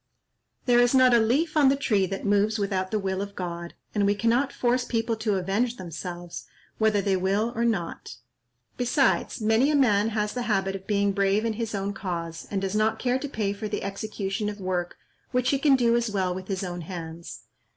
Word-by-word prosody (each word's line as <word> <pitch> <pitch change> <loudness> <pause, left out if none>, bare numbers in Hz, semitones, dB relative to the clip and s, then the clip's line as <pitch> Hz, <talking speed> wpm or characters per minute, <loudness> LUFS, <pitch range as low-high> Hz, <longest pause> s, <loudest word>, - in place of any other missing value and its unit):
There 245 -1 +5
is 245 +2 +4
not 255 -1 +6
a 235 - +6
leaf 280 +9 +1
on 290 -3 +6
the 275 - +3
tree 210 -8 +1
that 195 +1 -5
moves 205 +2 +2
without 195 -2 -1
the 215 - 0
will 190 -1 -2
of 200 0 -6
God, 170 -1 -5 0.2
and 210 - +1
we 205 - +2
cannot 235 +6 +1
force 245 0 +1
people 230 -1 -1
to 215 -2 0
avenge 200 +6 0
themselves, 175 -1 -7 0.3
whether 215 -2 +2
they 195 -2 +2
will 200 +5 0
or 235 - 0
not. 195 - -2 0.6
Besides, 255 0 +1
many 225 +6 +3
a 305 - +2
man 220 -6 +3
has 210 -1 -1
the 250 - -3
habit 195 -2 +1
of 195 0 -9
being 200 -1 +2
brave 200 +2 +1
in 225 - 0
his 225 -1 -3
own 200 +1 -2
cause, 170 -4 -5
and 200 - -1
does 195 +1 -2
not 215 +1 +2
care 250 +1 0
to 285 - -5
pay 210 -6 -1
for 210 +1 -5
the - - -3
execution 200 0 -3
of 205 0 -7
work 180 -2 -2 0.3
which 250 0 +1
he 275 - +1
can 280 -1 +5
do 235 -2 +3
as 235 -1 +1
well 190 -3 0
with 185 +1 -7
his 195 -1 -2
own 175 -1 -4
hands." 165 -1 -7
205 Hz, 215 wpm, -26 LUFS, 190-235 Hz, 0.6 s, not